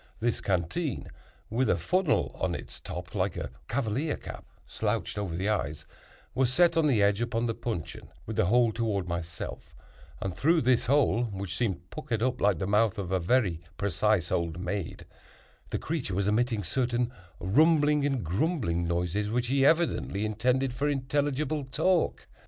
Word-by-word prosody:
This 120 +1 0
canteen 95 - -1 0.4
(with 125 +4 +1
a - - +3
funnel 185 -2 +1
on - - -2
its - - -8
top, - - -7
like - - -1
a - - -4 0.2
cavalier 130 +5 -1
cap - - -9 0.2
slouched 110 +1 -2
over 100 -5 -3
the 95 +4 -1
eyes) 75 -9 -1 0.5
was 130 -1 +2
set 170 +4 +4
on 160 -2 +3
edge 105 -4 +3
upon 120 0 0
the 115 - 0
puncheon, 110 -9 -5 0.2
with 110 - -5
the - - +3
hole 120 +2 +4
toward 105 -5 -1
myself; 85 0 -5 0.4
and 95 -2 -3
through 165 +3 +3
this 125 -2 +2
hole, 130 -3 +3
which 95 -4 -5
seemed 95 -6 -2
puckered 130 -8 -2
up 130 0 0
like 100 -3 +3
the 95 - -2
mouth 105 +2 +2
of 95 -3 -4
a 95 - +2
very 90 -3 +1 0.2
precise 100 -1 +1
old 85 0 -1
maid, 90 0 -4 0.6
the - - -1
creature 140 - -3
was 100 +1 +1
emitting 110 0 +1
certain 120 +4 0 0.3
rumbling 150 - +4
and 135 -5 0
grumbling 90 - 0
noises 90 +4 -1
which 120 +2 0
he 135 0 +3
evidently 150 - +2
intended 125 +4 +1
for 140 +3 0
intelligible 145 +2 0
talk. 160 +7 +1
115 Hz, 165 wpm, -29 LUFS, 95-135 Hz, 0.6 s, set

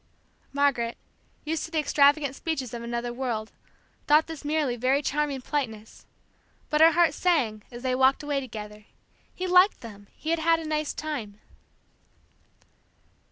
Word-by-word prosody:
Margaret, 275 -5 +1 0.5
used 315 +1 -2
to - - -10
the 325 - -3
extravagant 285 -1 +3
speeches 275 -8 -4
of 235 - -5
another 235 +1 -3
world, 235 -4 -3 0.6
thought 300 +2 +5
this 320 -3 -8
merely 295 -4 0
very 260 +4 +1
charming 285 -2 -1
politeness. 225 -7 -5 0.6
But 300 0 +2
her 325 0 +7
heart 340 -1 +4
sang, 260 -13 +1
as 240 0 -10
they 255 -1 0
walked 265 +2 +3
away 290 -1 -1
together. 210 -4 -8 0.5
He 370 - -4
liked 365 +2 +4
them 205 -3 -11
he 315 - -4
had 335 - +1
had 330 +1 +3
a 325 - -7
nice 305 -1 -2
time! 235 -10 -5
280 Hz, 150 wpm, -26 LUFS, 240-310 Hz, 0.6 s, her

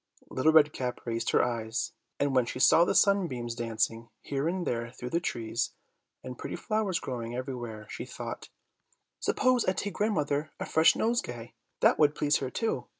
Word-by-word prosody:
Little 145 +5 +3
Red 150 -1 +6
Cap 125 -1 -3
raised 115 -1 -1
her - - +4
eyes, 115 -1 -2 0.3
and 140 -1 +1
when 125 -2 +3
she - - -4
saw 160 +6 +6
the - - 0
sunbeams 165 - +2
dancing 115 0 -2
here 140 +2 -1
and 180 +1 -1
there 115 0 -2
through 125 0 -8
the 170 - +2
trees, 115 -7 -2 0.5
and 125 -1 -8
pretty - - -5
flowers 215 -5 -1
growing 120 -2 -5
everywhere, 120 -4 -5
she - - -6
thought, - - -7 0.7
"Suppose 255 -2 +2
I 185 - +2
take 205 +1 -3
grandmother 155 -8 0
a - - -3
fresh 160 +1 +5
nosegay; 125 - -2 0.3
that - - +4
would 150 -1 +4
please 150 0 +2
her 130 - -3
too. 135 - -2
130 Hz, 175 wpm, -29 LUFS, 120-165 Hz, 0.7 s, Red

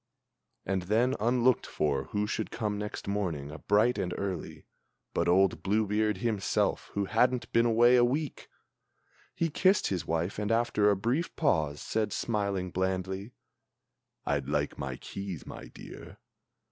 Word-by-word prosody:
And 95 0 0
then, 110 +8 +2
unlooked 120 +2 +2
for, 70 -3 -1
who 105 0 -1
should 105 - -3
come 105 -3 -2
next 105 -1 -5
morning, 85 -8 -2
bright 105 +4 +3
and 90 -2 -2
early, 95 -4 -5 0.5
But - - 0
old 95 -2 +3
Blue 105 +4 +1
beard 105 0 +1
himself 105 -1 0
who 100 0 0
hadn't 125 +5 +1
been 115 0 +4
away 120 +2 +5
a 120 - +5
week! 140 +4 -2 0.9
He 165 -2 0
kissed 190 +6 +3
his 90 -3 -2
wife, 85 +5 -1
and, 105 +1 -1
after 115 -3 +3
a 100 - +4
brief 120 - -1
pause, 80 - +1
said, 110 -1 -1
smiling 100 -5 -1
blandly: 95 +4 -2 0.9
"I'd 70 -1 -1
like 75 0 0
my 65 -2 -3
keys, 100 -5 -7
my - - -9
dear." - - -11
105 Hz, 145 wpm, -29 LUFS, 90-115 Hz, 0.9 s, away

